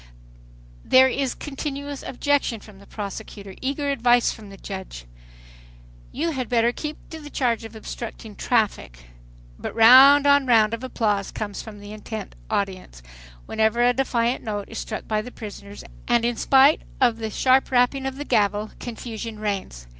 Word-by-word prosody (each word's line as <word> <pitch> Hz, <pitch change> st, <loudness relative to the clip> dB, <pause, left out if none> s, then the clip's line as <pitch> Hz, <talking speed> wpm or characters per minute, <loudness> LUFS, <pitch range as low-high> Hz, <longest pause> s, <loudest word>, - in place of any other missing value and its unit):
There 260 Hz, 0 st, +6 dB
is 265 Hz, 0 st, -2 dB
continuous 285 Hz, -1 st, -5 dB
objection 275 Hz, -3 st, -1 dB
from 205 Hz, -2 st, -15 dB
the 200 Hz, -, -17 dB
prosecutor, 200 Hz, -1 st, -7 dB
eager 280 Hz, +2 st, -1 dB
advice 245 Hz, -2 st, +3 dB
from 215 Hz, -2 st, -11 dB
the 195 Hz, -, -12 dB
judge, 190 Hz, -, -8 dB, 1.1 s
"you 325 Hz, +5 st, -2 dB
had 260 Hz, -5 st, -4 dB
better 235 Hz, -1 st, +3 dB
keep 300 Hz, +4 st, -6 dB
to 320 Hz, -, -7 dB
the 295 Hz, -1 st, -10 dB
charge 240 Hz, -5 st, 0 dB
of 225 Hz, 0 st, -10 dB
obstructing 220 Hz, -1 st, -8 dB
traffic" 215 Hz, -, 0 dB, 0.6 s
But -, -, -6 dB
round 265 Hz, +5 st, +8 dB
on 285 Hz, -1 st, +4 dB
round 225 Hz, -2 st, +4 dB
of 230 Hz, +2 st, -4 dB
applause 210 Hz, -6 st, -1 dB
comes 205 Hz, -2 st, -5 dB
from 215 Hz, -2 st, -11 dB
the 205 Hz, +1 st, -10 dB
intent 215 Hz, 0 st, -7 dB, 0.2 s
audience, 185 Hz, -, -3 dB, 0.4 s
whenever 220 Hz, -, +1 dB
a 245 Hz, 0 st, +4 dB
defiant 245 Hz, -1 st, 0 dB
note 205 Hz, -2 st, -4 dB
is 225 Hz, -, -6 dB
struck 220 Hz, -, -6 dB
by 215 Hz, -1 st, 0 dB
the 240 Hz, -, -9 dB
prisoners, 205 Hz, -2 st, -10 dB, 0.2 s
and 240 Hz, -1 st, +2 dB
in 240 Hz, 0 st, 0 dB
spite 270 Hz, +5 st, +4 dB, 0.2 s
of 240 Hz, -3 st, +3 dB
the 220 Hz, -1 st, -4 dB
sharp 260 Hz, +5 st, +2 dB
rapping 260 Hz, +2 st, +2 dB
of 265 Hz, -, -4 dB
the 290 Hz, +2 st, -6 dB
gavel 205 Hz, -1 st, +1 dB
confusion 230 Hz, -2 st, -6 dB
reigns. 195 Hz, -, -4 dB
230 Hz, 160 wpm, -23 LUFS, 210-265 Hz, 1.1 s, round